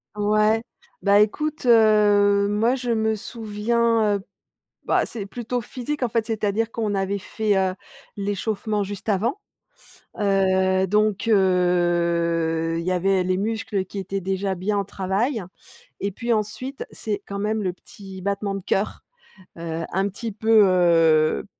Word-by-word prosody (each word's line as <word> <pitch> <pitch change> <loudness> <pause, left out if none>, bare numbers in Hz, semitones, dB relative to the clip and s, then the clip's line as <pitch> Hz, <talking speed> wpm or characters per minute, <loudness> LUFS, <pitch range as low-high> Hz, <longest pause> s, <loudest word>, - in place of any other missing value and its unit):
Ouais. 215 +1 +2 0.4
Bah, 200 0 +4
écoute, 300 +7 -1
heu, 210 -3 +5
moi, 220 +5 +2
je 250 -2 -3
me 220 -1 +1
souviens, 220 0 0
heu, 195 - -11 0.6
bah, - - +2
c'est 215 -4 -6
plutôt 240 +4 -4
physique 260 +4 -4
en 240 - +1
fait, 230 -1 0
c'est-à-dire 220 0 -1
qu'on 215 -3 -1
avait 195 +1 -1
fait, 215 +1 -1
heu, 190 -1 +1 0.4
l'échauffement 205 +1 -2
juste 200 +1 -7
avant. 220 - 0 0.8
Heu, 190 -1 +2
donc 210 +1 +1
heu, 170 -4 +2
il - - -4
y 185 - 0
avait 185 +1 +2
les 185 0 0
muscles 210 -2 -2
qui 200 - -7
étaient 195 +1 -3
déjà 190 +1 -2
bien 200 +3 -1
au - - 0
travail 200 +5 -2 0.6
et 200 - -2
puis 235 +4 -1
ensuite, 230 +6 -3
c'est 210 -2 -4
quand 200 0 -5
même 215 +1 -1
le 185 - 0
petit 190 0 -12
battement 200 0 -2
de 195 - -6
cœur. 195 +3 -1 0.5
Heu, 165 0 -4
un 195 +2 +1
petit 225 +3 -6
peu, 220 +1 +4
heu, 165 -4 +3
205 Hz, 145 wpm, -23 LUFS, 190-220 Hz, 0.8 s, heu